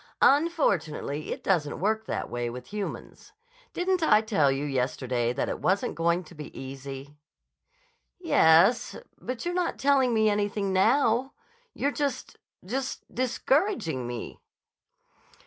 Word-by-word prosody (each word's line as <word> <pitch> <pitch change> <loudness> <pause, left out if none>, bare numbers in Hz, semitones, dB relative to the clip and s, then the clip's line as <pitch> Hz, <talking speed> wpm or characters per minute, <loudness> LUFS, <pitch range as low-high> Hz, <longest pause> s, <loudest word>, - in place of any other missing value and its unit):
"Unfortunately 190 - +1
it - - -5
doesn't 160 -7 0
work 220 +3 0
that - - -3
way 120 0 -3
with 125 +10 -9
humans. 210 - -6 0.4
Didn't 365 0 0
I 215 -9 +5
tell 195 - +2
you 135 +2 -2
yesterday 125 -3 -1
that 125 - -2
it - - -3
wasn't 190 +2 +1
going 170 +2 +1
to 170 - -15
be 150 -2 -9
easy?" 135 +2 -8 1.0
"Yes. 200 - +4 0.2
But 255 +2 -5
you're 350 - -1
not 355 -1 -1
telling 270 -2 +3
me 220 -1 +3
anything 205 -1 0
now. 235 +5 +3 0.4
You're 285 - 0
just—just 265 -3 -5
discouraging 255 - 0
me." 120 -2 -6
200 Hz, 125 wpm, -27 LUFS, -, 1.0 s, I